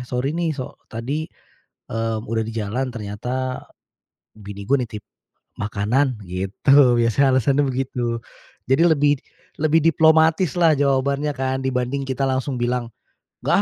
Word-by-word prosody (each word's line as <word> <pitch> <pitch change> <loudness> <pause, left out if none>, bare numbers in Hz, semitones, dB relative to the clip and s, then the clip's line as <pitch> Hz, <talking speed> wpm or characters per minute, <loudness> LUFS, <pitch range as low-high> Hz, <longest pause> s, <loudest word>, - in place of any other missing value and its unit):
sorry 125 +4 -2
nih 170 -1 0
so 135 -4 -5 0.2
tadi, 140 +8 -4 0.6
eee, 115 0 -1
udah 115 +1 -1
di 110 - -4
jalan 115 +4 -2
ternyata, 125 +4 -4 0.7
bini 100 -1 -9
gue 140 - +4
nitip 110 -3 -8 0.6
makanan." 110 +4 0
Gitu, 105 +9 +3
biasanya 120 +3 +3
alasannya 140 +3 +2
begitu. 125 -3 -2 0.5
Jadi 135 +5 +4
lebih, 145 -3 +4 0.5
lebih 155 +1 +3
diplomatislah 160 0 +4
jawabannya 140 +1 +1
kan, 130 0 -1
dibanding 130 +1 -1
kita 135 0 -2
langsung 130 +1 -1
bilang, 120 0 0 0.5
"Enggak - - +1
130 Hz, 125 wpm, -22 LUFS, 115-140 Hz, 0.7 s, gue